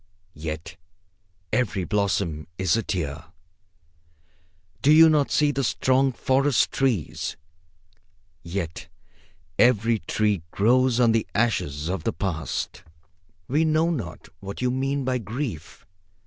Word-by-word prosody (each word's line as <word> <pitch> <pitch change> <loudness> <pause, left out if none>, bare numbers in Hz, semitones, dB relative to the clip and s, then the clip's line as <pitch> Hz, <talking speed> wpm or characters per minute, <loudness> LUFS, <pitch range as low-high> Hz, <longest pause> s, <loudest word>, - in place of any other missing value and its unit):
Yet 80 +2 -6 0.8
every 105 -6 0
blossom 95 -6 -1
is 95 0 +2
a 115 - +1
tear. 80 -7 -3 1.6
Do 145 - +4
you 160 +1 +8
not 150 -2 +2
see 150 -1 +3
the 135 -1 -2
strong 130 +2 +2
forest 135 +1 +2
trees? 125 - -1 1.0
Yet 85 -2 -5 0.7
every 115 -2 +4
tree 105 +1 0
grows 125 +6 +3
on 120 -2 +5
the 115 0 +1
ashes 85 -10 0
of 95 +2 -3
the 115 - -1
past. 85 -5 -3 0.7
We 150 +5 +2
know 160 +1 +2
not 110 - -5
what 100 +1 -7
you 125 0 +1
mean 135 +1 -1
by 130 -1 0
grief. 110 - -6
115 Hz, 120 wpm, -24 LUFS, 90-130 Hz, 1.6 s, you